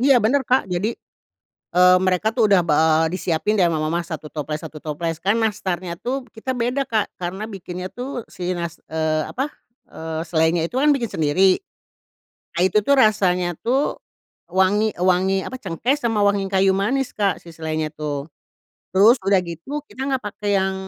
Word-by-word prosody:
Iya 270 Hz, +1 st, +5 dB
benar 275 Hz, +5 st, +3 dB
Kak. 255 Hz, -3 st, +2 dB
Jadi, 195 Hz, +6 st, -1 dB, 0.8 s
eee, 180 Hz, 0 st, +7 dB
mereka 185 Hz, +4 st, +1 dB
tuh 230 Hz, -4 st, +3 dB
udah 195 Hz, -2 st, +6 dB
ba 150 Hz, -, +3 dB, 0.3 s
eee, 160 Hz, -, -3 dB
disiapin 185 Hz, +3 st, 0 dB
dari 180 Hz, -3 st, +5 dB
rumah 155 Hz, -2 st, -1 dB
mamah 170 Hz, +1 st, 0 dB
1 160 Hz, -2 st, -6 dB
toples 150 Hz, 0 st, -4 dB
1 160 Hz, -1 st, -8 dB
toples. 160 Hz, +1 st, -3 dB
Kan 200 Hz, +4 st, +2 dB
nastarnya 185 Hz, -5 st, -2 dB
tuh 260 Hz, +1 st, -3 dB
kita 220 Hz, +4 st, -5 dB
beda 245 Hz, +3 st, 0 dB
Kak 220 Hz, -3 st, -1 dB
karena 185 Hz, +4 st, -4 dB
bikinnya 180 Hz, -2 st, -6 dB
tuh 250 Hz, -1 st, -5 dB
si 180 Hz, 0 st, -4 dB
nas 170 Hz, -1 st, -5 dB
eee, 155 Hz, -1 st, 0 dB
apa, 265 Hz, +2 st, -1 dB, 0.4 s
eee, 160 Hz, 0 st, -5 dB
selainya 160 Hz, 0 st, +2 dB
itu 245 Hz, -, -7 dB
kan 295 Hz, +2 st, +4 dB
bikin 235 Hz, -6 st, -2 dB
sendiri. 180 Hz, -, +3 dB, 1.0 s
Nah, 170 Hz, -, 0 dB
itu 190 Hz, +3 st, +3 dB
tuh 280 Hz, +6 st, +4 dB
rasanya 180 Hz, -6 st, +3 dB
tuh 265 Hz, +5 st, 0 dB, 0.5 s
wangi 190 Hz, +4 st, +2 dB
wangi, 185 Hz, +2 st, +2 dB
apa, -, -, -6 dB
cengkeh 215 Hz, -, 0 dB
sama 225 Hz, -4 st, +1 dB
wangi 200 Hz, -1 st, +2 dB
kayu 190 Hz, 0 st, +3 dB
manis 250 Hz, +7 st, 0 dB
Kak 200 Hz, -2 st, +1 dB
si 170 Hz, -, -11 dB
selainya 160 Hz, -1 st, -3 dB
tuh. 150 Hz, -2 st, -4 dB, 0.7 s
Terus 215 Hz, +7 st, +6 dB
udah 195 Hz, -2 st, +4 dB
gitu 180 Hz, -, -6 dB
kita 265 Hz, +1 st, -5 dB
enggak 265 Hz, -2 st, -1 dB
pakai 205 Hz, 0 st, -4 dB
yang 190 Hz, 0 st, 0 dB
190 Hz, 175 wpm, -22 LUFS, 170-220 Hz, 1.0 s, eee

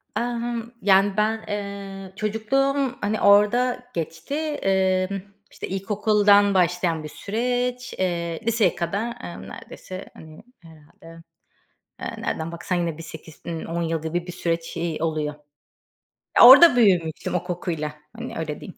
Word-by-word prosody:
Aaa, 240 Hz, +2 st, -1 dB
hımm, 235 Hz, -1 st, -4 dB
yani, 195 Hz, 0 st, +4 dB
ben, 220 Hz, +1 st, +1 dB
eee, 200 Hz, -2 st, -6 dB
çocukluğum, 255 Hz, +6 st, 0 dB
hani, 210 Hz, +1 st, -1 dB
orada 240 Hz, +5 st, +4 dB
geçti. 165 Hz, -, -4 dB
Emm, 195 Hz, -10 st, 0 dB, 0.3 s
işte, -, -, -7 dB
ilkokuldan 205 Hz, +1 st, +3 dB
başlayan 180 Hz, -3 st, +1 dB
bir 155 Hz, -, -7 dB
süreç. 245 Hz, +6 st, -2 dB
Eee, 170 Hz, -3 st, -1 dB
liseye 230 Hz, -1 st, +2 dB
kadar, 205 Hz, +7 st, -2 dB
emm, 170 Hz, -, -8 dB
neredeyse, 185 Hz, 0 st, -9 dB
hani, 155 Hz, +2 st, -13 dB, 0.2 s
herhalde, 165 Hz, +1 st, -16 dB, 0.8 s
eee, -, -, -5 dB
nereden 160 Hz, +1 st, -3 dB
baksan, 170 Hz, +2 st, -3 dB
yine 170 Hz, -3 st, -1 dB
bir 165 Hz, -, -8 dB
8-10 160 Hz, +1 st, -6 dB
yıl 165 Hz, -1 st, -1 dB
gibi 170 Hz, +3 st, -3 dB
bir -, -, -5 dB
süreç, 170 Hz, -2 st, -3 dB
iii, 165 Hz, -2 st, -3 dB
oluyor. 155 Hz, -2 st, -1 dB, 1.1 s
A -, -, +11 dB
orada 290 Hz, +2 st, +10 dB
büyümüştüm 180 Hz, -9 st, +2 dB
o 180 Hz, -, 0 dB
kokuyla. 175 Hz, -4 st, -3 dB, 0.3 s
Hani, -, -, -6 dB
öyle 155 Hz, -2 st, -4 dB
diyeyim. 185 Hz, -, -10 dB
190 Hz, 135 wpm, -23 LUFS, 165-220 Hz, 1.1 s, A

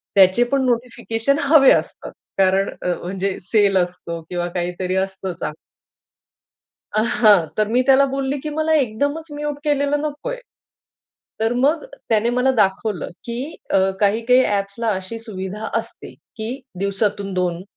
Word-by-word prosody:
त्याचे 190 Hz, +4 st, +6 dB
पण 270 Hz, -1 st, +2 dB
नोटिफिकेशन 240 Hz, +1 st, 0 dB
हवे 280 Hz, -1 st, +6 dB
असतात, -, -, 0 dB, 0.3 s
कारण 195 Hz, +1 st, +3 dB
अ‍, 180 Hz, -, 0 dB
म्हणजे 190 Hz, +1 st, -2 dB
सेल 200 Hz, 0 st, +3 dB
असतो 175 Hz, -2 st, -2 dB
किंवा 175 Hz, -1 st, -2 dB
काहीतरी 180 Hz, +1 st, -2 dB
असतं 190 Hz, -1 st, -2 dB
चांगलं. 155 Hz, -2 st, -5 dB, 1.4 s
आ, 215 Hz, -, +3 dB
हां. 210 Hz, -7 st, +4 dB
तर 215 Hz, -1 st, +2 dB
मी 245 Hz, +3 st, +2 dB
त्याला 275 Hz, 0 st, +6 dB
बोलली 275 Hz, +1 st, -2 dB
की 305 Hz, -, -5 dB
मला 315 Hz, 0 st, +1 dB
एकदमच 285 Hz, +7 st, -1 dB
म्यूट 295 Hz, 0 st, -3 dB
केलेलं 290 Hz, 0 st, +1 dB
नकोय. 305 Hz, +12 st, -4 dB, 1.0 s
तर 225 Hz, +2 st, +1 dB
मग 305 Hz, -, +2 dB, 0.3 s
त्याने 225 Hz, +1 st, +2 dB
मला 250 Hz, +2 st, +2 dB
दाखवलं, 195 Hz, 0 st, 0 dB, 0.2 s
की 235 Hz, 0 st, -4 dB, 0.4 s
अ, -, -, +5 dB, 0.2 s
काही-काही 230 Hz, +5 st, +3 dB
अ‍ॅप्सला 205 Hz, +3 st, -1 dB
अशी 190 Hz, +5 st, -5 dB
सुविधा 210 Hz, -1 st, -6 dB
असते -, -, -8 dB, 0.2 s
की 220 Hz, +1 st, -4 dB, 0.3 s
दिवसातून 200 Hz, 0 st, -1 dB
2 180 Hz, -1 st, -1 dB
220 Hz, 140 wpm, -21 LUFS, 190-265 Hz, 1.4 s, त्याचे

